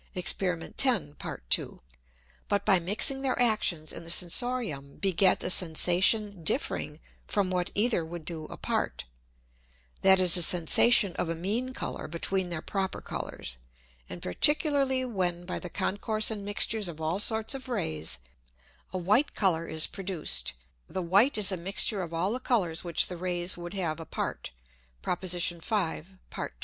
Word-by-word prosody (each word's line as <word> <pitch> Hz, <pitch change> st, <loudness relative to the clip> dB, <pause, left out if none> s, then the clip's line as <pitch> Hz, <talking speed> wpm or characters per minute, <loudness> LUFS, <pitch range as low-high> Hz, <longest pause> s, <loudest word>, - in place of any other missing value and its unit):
(Exper. 180 Hz, -1 st, +1 dB
10. 210 Hz, -, +2 dB
Part -, -, -8 dB
2.) -, -, +1 dB, 0.7 s
but 205 Hz, -1 st, 0 dB
by 195 Hz, -4 st, +4 dB
mixing 210 Hz, +10 st, +2 dB
their 265 Hz, -2 st, -1 dB
Actions 200 Hz, -10 st, +1 dB
in -, -, -8 dB
the 165 Hz, -, -10 dB
Sensorium 170 Hz, -, 0 dB
beget 190 Hz, -1 st, +2 dB
a 180 Hz, -, +1 dB
Sensation 180 Hz, +3 st, +3 dB
differing 150 Hz, -1 st, -2 dB, 0.3 s
from 195 Hz, -3 st, -1 dB
what 180 Hz, -1 st, -1 dB
either 215 Hz, -4 st, +1 dB
would 165 Hz, 0 st, -9 dB
do 160 Hz, -2 st, -5 dB
apart, -, -, -4 dB, 1.0 s
that 190 Hz, 0 st, +6 dB
is 180 Hz, -2 st, +4 dB
a 175 Hz, -, +2 dB
Sensation 180 Hz, +5 st, +4 dB
of 170 Hz, -, -2 dB
a 165 Hz, -, -2 dB
mean 215 Hz, +10 st, -3 dB
Colour -, -, -5 dB
between 180 Hz, +3 st, -1 dB
their 170 Hz, -2 st, -5 dB
proper 195 Hz, -1 st, -3 dB
Colours; 65 Hz, -, -6 dB, 0.5 s
and 90 Hz, 0 st, -9 dB
particularly 275 Hz, -, +2 dB
when 180 Hz, -7 st, -3 dB
by 180 Hz, -, -4 dB
the 180 Hz, -, -7 dB
concourse 215 Hz, +5 st, 0 dB
and 210 Hz, -2 st, -5 dB
mixtures 205 Hz, +1 st, 0 dB
of 165 Hz, -2 st, -7 dB
all 160 Hz, +4 st, -2 dB
sorts 220 Hz, +2 st, +2 dB
of 265 Hz, -1 st, -8 dB
Rays, 80 Hz, -, -2 dB, 0.7 s
a 185 Hz, -, -4 dB
white 210 Hz, +11 st, +1 dB
Colour 170 Hz, -5 st, +1 dB
is 160 Hz, 0 st, +6 dB
produced, 175 Hz, -, +1 dB, 0.3 s
the 185 Hz, -, -5 dB
white 200 Hz, +10 st, +3 dB
is 205 Hz, -2 st, +4 dB
a 190 Hz, -, -2 dB
mixture 195 Hz, +3 st, +1 dB
of 170 Hz, -2 st, -6 dB
all 170 Hz, +4 st, -1 dB
the 250 Hz, -, -3 dB
Colours 190 Hz, -11 st, 0 dB
which 170 Hz, -3 st, +2 dB
the 180 Hz, -, -7 dB
Rays 175 Hz, 0 st, -1 dB
would 175 Hz, +2 st, -8 dB
have 165 Hz, -5 st, -3 dB
apart, 165 Hz, -, -5 dB, 0.5 s
(Prop. 180 Hz, +1 st, -3 dB
5. 180 Hz, 0 st, 0 dB
Part -, -, -6 dB
2.) -, -, -39 dB
185 Hz, 160 wpm, -28 LUFS, 170-210 Hz, 1.0 s, that